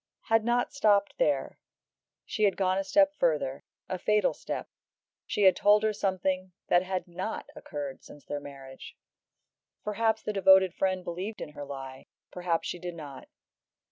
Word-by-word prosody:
had 225 Hz, -1 st, +4 dB
not 240 Hz, +3 st, +1 dB
stopped 205 Hz, -7 st, +3 dB
there; -, -, 0 dB, 0.7 s
she 215 Hz, -, +1 dB
had 200 Hz, -, +2 dB
gone 185 Hz, 0 st, +2 dB
a -, -, -1 dB
step 290 Hz, +8 st, +4 dB
further, 150 Hz, -5 st, 0 dB, 0.2 s
a 185 Hz, -1 st, -3 dB
fatal 210 Hz, +3 st, +2 dB
step; -, -, -5 dB, 0.6 s
she 205 Hz, -, 0 dB
had 190 Hz, -2 st, +7 dB
told 210 Hz, +3 st, +4 dB
her 215 Hz, 0 st, +2 dB
something 185 Hz, -2 st, -1 dB, 0.2 s
that 175 Hz, -, +5 dB
had 185 Hz, 0 st, -3 dB
not 185 Hz, +5 st, -5 dB
occurred 145 Hz, -3 st, -6 dB
since 145 Hz, -, -14 dB
their 145 Hz, -, -4 dB
marriage. 135 Hz, -2 st, -11 dB, 0.9 s
Perhaps 220 Hz, +1 st, 0 dB
the 215 Hz, -, -2 dB
devoted 190 Hz, -2 st, +6 dB
friend 185 Hz, -1 st, 0 dB
believed 185 Hz, +5 st, -5 dB
in -, -, -6 dB
her 145 Hz, -1 st, -8 dB
lie, 135 Hz, -1 st, -8 dB, 0.2 s
perhaps 175 Hz, -2 st, -1 dB
she 175 Hz, -, -4 dB
did 175 Hz, 0 st, -6 dB
not. 145 Hz, -5 st, -9 dB
185 Hz, 160 wpm, -29 LUFS, 165-210 Hz, 0.9 s, had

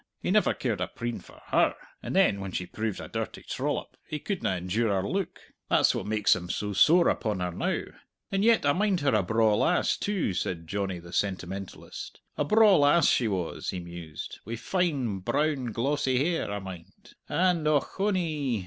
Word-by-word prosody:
He -, -, -2 dB
never -, -, +3 dB
cared -, -, -2 dB
a -, -, 0 dB
preen 120 Hz, 0 st, -4 dB
for -, -, -16 dB
her, -, -, +3 dB, 0.3 s
and -, -, -5 dB
then 100 Hz, -, +4 dB
when 95 Hz, -1 st, -5 dB
she 90 Hz, -, -3 dB
proved 110 Hz, +2 st, -3 dB
a -, -, -7 dB
dirty -, -, -5 dB
trollop, -, -, -3 dB
he 155 Hz, -, -3 dB
couldna 170 Hz, -, -2 dB
endure 100 Hz, +6 st, 0 dB
her 95 Hz, -, -2 dB
look! 190 Hz, -1 st, -2 dB, 0.3 s
That's -, -, +4 dB
what -, -, -4 dB
makes 105 Hz, -1 st, +3 dB
him 90 Hz, -1 st, -6 dB
so 105 Hz, +2 st, -2 dB
sore 170 Hz, -, +5 dB
upon 105 Hz, -5 st, 0 dB
her 90 Hz, 0 st, -1 dB
now. -, -, -1 dB, 0.5 s
And 195 Hz, +1 st, +1 dB
yet 230 Hz, -7 st, +4 dB
I 145 Hz, -, +4 dB
mind 195 Hz, -1 st, +1 dB
her 140 Hz, -3 st, +2 dB
a 105 Hz, -, +4 dB
braw 110 Hz, +2 st, +2 dB
lass, 175 Hz, +11 st, +2 dB
too," 195 Hz, -, -1 dB
said 85 Hz, -1 st, -3 dB
Johnny 95 Hz, +1 st, -2 dB
the 85 Hz, 0 st, -11 dB
sentimentalist, 95 Hz, 0 st, -4 dB, 0.2 s
"a -, -, 0 dB
braw 215 Hz, +4 st, +6 dB
lass 145 Hz, +2 st, +5 dB
she 120 Hz, -, +2 dB
was," 95 Hz, -5 st, -3 dB
he 90 Hz, -, -3 dB
mused, 85 Hz, -3 st, -8 dB
"wi' 115 Hz, +3 st, -5 dB
fine, 135 Hz, -, -1 dB
brown 145 Hz, +7 st, 0 dB
glossy 130 Hz, +2 st, 0 dB
hair, 160 Hz, -2 st, 0 dB
I 105 Hz, -, -2 dB
mind, 95 Hz, -4 st, -10 dB, 0.2 s
and 175 Hz, -4 st, +2 dB
ochonee! 155 Hz, -, 0 dB
115 Hz, 185 wpm, -28 LUFS, 95-160 Hz, 0.5 s, braw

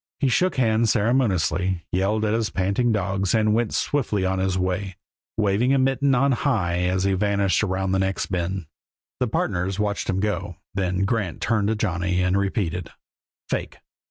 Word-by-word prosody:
He 140 Hz, -1 st, +2 dB
shook 185 Hz, +9 st, +2 dB
hands 115 Hz, -2 st, +2 dB
ceremoniously, 95 Hz, -6 st, +1 dB
yelled 105 Hz, +4 st, +1 dB
at 105 Hz, -, +1 dB
his 115 Hz, -1 st, 0 dB
panting 100 Hz, +6 st, 0 dB
dogs, 100 Hz, -2 st, 0 dB
and 110 Hz, -1 st, +3 dB
went 115 Hz, 0 st, +1 dB
swiftly 110 Hz, -9 st, 0 dB
on 95 Hz, 0 st, 0 dB
his 95 Hz, 0 st, 0 dB
way, 95 Hz, +1 st, -2 dB, 0.4 s
waving 110 Hz, +5 st, +2 dB
a -, -, +3 dB
mitten 135 Hz, +1 st, +2 dB
on 135 Hz, +3 st, +3 dB
high 110 Hz, -10 st, 0 dB
as 90 Hz, +1 st, 0 dB
he 100 Hz, 0 st, +2 dB
vanished 100 Hz, -1 st, +1 dB
around 95 Hz, -2 st, -1 dB
the 95 Hz, -, +1 dB
next 95 Hz, 0 st, 0 dB
bend. 90 Hz, 0 st, -2 dB, 0.5 s
The -, -, +1 dB
partners 90 Hz, +2 st, -1 dB
watched 105 Hz, -1 st, -1 dB
him 95 Hz, 0 st, +1 dB
go, 105 Hz, +1 st, -2 dB, 0.2 s
then 95 Hz, -1 st, 0 dB
Grant 100 Hz, -5 st, -1 dB
turned 110 Hz, -3 st, +1 dB
to 110 Hz, -, +1 dB
Johnny, 90 Hz, -3 st, -1 dB
and 90 Hz, +1 st, +1 dB
repeated: 95 Hz, -3 st, -1 dB, 0.6 s
"Fake! -, -, -3 dB
100 Hz, 170 wpm, -23 LUFS, 95-110 Hz, 0.6 s, and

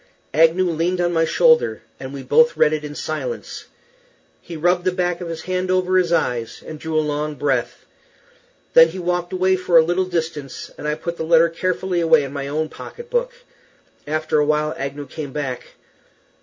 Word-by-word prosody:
Agnew 165 Hz, +4 st, +4 dB
leaned 170 Hz, +2 st, -1 dB
on 175 Hz, 0 st, +1 dB
my 165 Hz, -1 st, +3 dB
shoulder, 475 Hz, -, +3 dB, 0.2 s
and 130 Hz, 0 st, -7 dB
we 140 Hz, -1 st, -7 dB
both 475 Hz, +1 st, +4 dB
read 150 Hz, -, +4 dB
it 155 Hz, -1 st, -2 dB
in 150 Hz, 0 st, -7 dB
silence. 480 Hz, -, -5 dB, 0.8 s
He 170 Hz, -, -8 dB
rubbed 175 Hz, +3 st, +2 dB
the 185 Hz, -, +1 dB
back 180 Hz, -1 st, -1 dB
of 175 Hz, -, -5 dB
his 165 Hz, -1 st, -6 dB
hand 185 Hz, 0 st, -2 dB
over 185 Hz, 0 st, +1 dB
his 180 Hz, -2 st, +3 dB
eyes 120 Hz, -8 st, -1 dB
and 155 Hz, -, -8 dB
drew 160 Hz, 0 st, -3 dB
a 155 Hz, -, +2 dB
long 150 Hz, 0 st, -2 dB
breath. 135 Hz, -3 st, -2 dB, 0.9 s
Then 165 Hz, 0 st, +8 dB
he 165 Hz, +3 st, -8 dB
walked 175 Hz, 0 st, -2 dB
away 185 Hz, 0 st, +2 dB
for 180 Hz, -2 st, +3 dB
a 160 Hz, -, +7 dB
little 175 Hz, +3 st, +1 dB
distance, 160 Hz, -6 st, -4 dB
and 150 Hz, -, -6 dB
I 150 Hz, -, 0 dB
put 170 Hz, +2 st, -5 dB
the -, -, -3 dB
letter 165 Hz, +1 st, +4 dB
carefully 180 Hz, +1 st, -1 dB
away 160 Hz, -2 st, +4 dB
in 135 Hz, 0 st, -6 dB
my 140 Hz, -1 st, -4 dB
own 155 Hz, +2 st, -1 dB
pocket 475 Hz, -, -11 dB
book. -, -, 0 dB, 0.8 s
After 155 Hz, 0 st, 0 dB
a -, -, +4 dB
little 150 Hz, 0 st, +1 dB
while 150 Hz, 0 st, +1 dB
Agnew 140 Hz, +1 st, -5 dB
came 145 Hz, -2 st, -7 dB
back. 130 Hz, -4 st, -5 dB
165 Hz, 195 wpm, -21 LUFS, 150-180 Hz, 0.9 s, Then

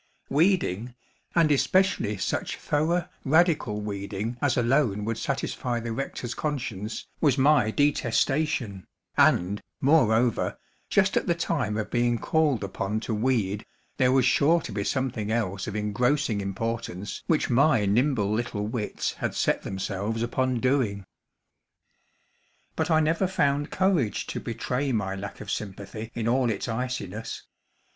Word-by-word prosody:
Weeding, 135 Hz, -, +1 dB, 0.4 s
and 165 Hz, -3 st, +4 dB
especially 145 Hz, -, +2 dB
such -, -, -2 dB
thorough, 170 Hz, +4 st, 0 dB, 0.2 s
radical 150 Hz, -, +2 dB
weeding 100 Hz, +2 st, -4 dB
as 140 Hz, -4 st, +2 dB
alone 120 Hz, -4 st, +2 dB
would 115 Hz, 0 st, -2 dB
satisfy 125 Hz, -3 st, -2 dB
the 115 Hz, 0 st, -4 dB
rector's 120 Hz, -1 st, -4 dB
conscience, 120 Hz, -8 st, -4 dB
was 145 Hz, -4 st, +3 dB
my 140 Hz, -5 st, +4 dB
detestation; 135 Hz, -, 0 dB, 0.3 s
and, 100 Hz, +4 st, +3 dB, 0.2 s
moreover, 125 Hz, -5 st, +3 dB, 0.3 s
just 195 Hz, 0 st, +3 dB
at -, -, 0 dB
the 170 Hz, -, +2 dB
time 145 Hz, -, -1 dB
of 110 Hz, -1 st, -3 dB
being 120 Hz, -1 st, +2 dB
called 145 Hz, -4 st, +1 dB
upon 100 Hz, +2 st, -2 dB
to 115 Hz, -, -3 dB
weed, 110 Hz, -3 st, 0 dB, 0.3 s
there 130 Hz, -2 st, +4 dB
was 130 Hz, -2 st, +4 dB
sure 165 Hz, +4 st, +4 dB
to -, -, -7 dB
be 100 Hz, -, -2 dB
something 115 Hz, -4 st, -1 dB
else 100 Hz, -4 st, -1 dB
of 105 Hz, -, -4 dB
engrossing 110 Hz, +2 st, +1 dB
importance 105 Hz, 0 st, -4 dB
which 155 Hz, -5 st, +1 dB
my 135 Hz, -3 st, +4 dB
nimble 110 Hz, 0 st, +2 dB
little 110 Hz, -2 st, -1 dB
wits 110 Hz, -1 st, -2 dB
had -, -, -3 dB
set -, -, +1 dB
themselves 100 Hz, +4 st, -3 dB
upon 130 Hz, +1 st, 0 dB
doing. 115 Hz, -7 st, 0 dB, 1.7 s
But -, -, -1 dB
I 160 Hz, -1 st, +4 dB
never 165 Hz, +4 st, +1 dB
found 145 Hz, -5 st, +1 dB
courage 180 Hz, -, +1 dB
to -, -, -3 dB
betray 125 Hz, +4 st, -2 dB
my 100 Hz, -5 st, -1 dB
lack 95 Hz, +1 st, -7 dB
of -, -, -5 dB
sympathy 105 Hz, +2 st, -5 dB
in 115 Hz, -1 st, -2 dB
all 125 Hz, +1 st, +2 dB
its 105 Hz, +1 st, -2 dB
iciness. 125 Hz, -4 st, -4 dB
120 Hz, 135 wpm, -26 LUFS, 105-145 Hz, 1.7 s, and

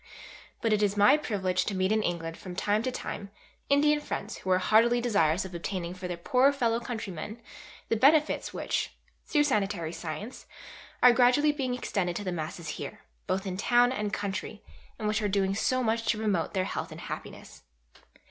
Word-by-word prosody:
But 225 Hz, -2 st, +2 dB
it 210 Hz, -, +2 dB
is 205 Hz, 0 st, +1 dB
my 205 Hz, +8 st, +7 dB
privilege 190 Hz, -10 st, -1 dB
to 200 Hz, -, -2 dB
meet 185 Hz, +1 st, +1 dB
in 215 Hz, 0 st, +3 dB
England 165 Hz, -4 st, -3 dB
from 180 Hz, 0 st, -9 dB
time 205 Hz, +3 st, +1 dB
to 255 Hz, +2 st, -2 dB
time 200 Hz, -4 st, -6 dB, 0.4 s
Indian 295 Hz, +1 st, +4 dB
friends 295 Hz, -, -5 dB
who 185 Hz, -, -6 dB
are 185 Hz, -, +5 dB
heartily 225 Hz, +5 st, +4 dB
desirous 195 Hz, -8 st, +2 dB
of 190 Hz, -, -9 dB
obtaining 175 Hz, 0 st, -4 dB
for 185 Hz, 0 st, -6 dB
their 175 Hz, -1 st, -4 dB
poorer 255 Hz, +10 st, +3 dB
fellow 235 Hz, -5 st, 0 dB
countrymen 220 Hz, -3 st, -6 dB, 0.5 s
the -, -, +1 dB
benefits 295 Hz, +6 st, +3 dB
which, -, -, -2 dB, 0.3 s
through 295 Hz, -2 st, +3 dB
sanitary 200 Hz, -, 0 dB
science, 175 Hz, -, -7 dB, 0.6 s
are 250 Hz, -1 st, +9 dB
gradually 255 Hz, +5 st, +4 dB
being 265 Hz, -4 st, -2 dB
extended 185 Hz, -8 st, -2 dB
to 205 Hz, -, -3 dB
the 185 Hz, -, -2 dB
masses 165 Hz, 0 st, -5 dB
here, -, -, -7 dB, 0.3 s
both 190 Hz, +1 st, -1 dB
in 185 Hz, -1 st, -3 dB
town 245 Hz, +4 st, +4 dB
and 210 Hz, -5 st, -2 dB
country, 205 Hz, +1 st, -4 dB, 0.3 s
and 215 Hz, -, -3 dB
which 215 Hz, +1 st, 0 dB
are 210 Hz, -, 0 dB
doing 195 Hz, -1 st, +1 dB
so 255 Hz, +5 st, +1 dB
much 225 Hz, 0 st, 0 dB
to 220 Hz, -, +2 dB
promote 205 Hz, -5 st, -1 dB
their 185 Hz, -1 st, +1 dB
health -, -, -4 dB
and -, -, -9 dB
happiness. -, -, -8 dB
210 Hz, 185 wpm, -28 LUFS, 185-245 Hz, 0.6 s, are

